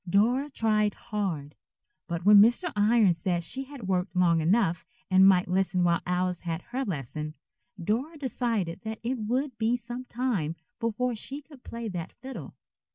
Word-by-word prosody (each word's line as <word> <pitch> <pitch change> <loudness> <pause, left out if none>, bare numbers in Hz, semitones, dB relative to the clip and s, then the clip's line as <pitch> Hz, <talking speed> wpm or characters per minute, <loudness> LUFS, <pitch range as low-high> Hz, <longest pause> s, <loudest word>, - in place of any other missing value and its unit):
Dora 245 +9 +3
tried 215 -5 +1
hard, 170 -9 -3 0.5
but 170 +1 -4
when 205 0 +9
Mr. 245 - +3
Irons 205 -4 +4
said 175 -1 0
she 265 +10 -5
had 265 -7 -9
worked 185 0 -1
long 170 -2 +4
enough 175 0 +2 0.3
and 190 +1 +7
might 185 -2 +5
listen 180 0 +1
while 170 -1 +2
Alice 180 0 0
had 170 0 -4
her 260 +2 -1
lesson, 155 - -4 0.4
Dora 240 - -1
decided 230 - -2
that 220 0 -5
it 245 +2 -1
would 245 +3 -2
be 230 +2 +2
some 245 +2 -7
time 230 -12 -1 0.2
before 240 +2 0
she 275 +6 -5
could 285 -4 -16
play 230 0 -6
that 180 -3 -5
fiddle. 265 +2 -9
210 Hz, 160 wpm, -28 LUFS, 180-245 Hz, 0.5 s, when